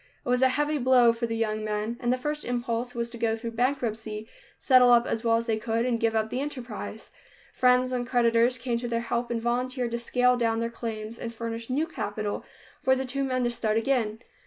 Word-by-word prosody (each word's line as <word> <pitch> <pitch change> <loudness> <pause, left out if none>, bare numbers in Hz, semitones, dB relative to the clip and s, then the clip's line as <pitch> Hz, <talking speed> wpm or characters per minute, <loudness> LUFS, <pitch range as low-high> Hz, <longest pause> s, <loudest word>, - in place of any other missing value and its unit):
It - - -4
was 250 0 +2
a 260 - +6
heavy 295 +3 0
blow 250 -2 +5
for 235 0 -2
the 225 - -2
young 215 -1 -1
men, 215 +2 -2
and 240 -1 0
the 255 - +2
first 300 +3 -3
impulse 245 0 -2
was 235 0 -1
to 235 - -6
go 225 -1 +1
through 230 +1 -5
bankruptcy, 225 -3 -2 0.3
settle 255 -2 +5
up 240 0 +6
as 225 - -2
well 230 -1 +3
as 230 - -2
they 225 -2 0
could 230 +1 -1
and 240 -2 0
give 225 0 +1
up 220 0 0
the 250 - -1
enterprise. 270 -4 -6 0.4
Friends 250 0 +3
and 245 -1 -2
creditors 240 0 +3
came 235 -1 -2
to 240 - -4
their 230 0 -1
help 235 0 -2
and 235 -1 -1
volunteered 245 +1 -1
to 235 - -2
scale 250 +1 +2
down 225 -2 +1
their 230 0 -2
claims 225 -1 -6
and 230 0 -6
furnish 230 +1 -5
new 285 +5 +1
capital 210 -9 -4 0.4
for 260 - +3
the 265 0 -2
two 275 +2 -2
men 255 -1 0
to 240 - +1
start 220 -2 0
again. 225 -3 0
235 Hz, 230 wpm, -27 LUFS, 230-250 Hz, 0.4 s, a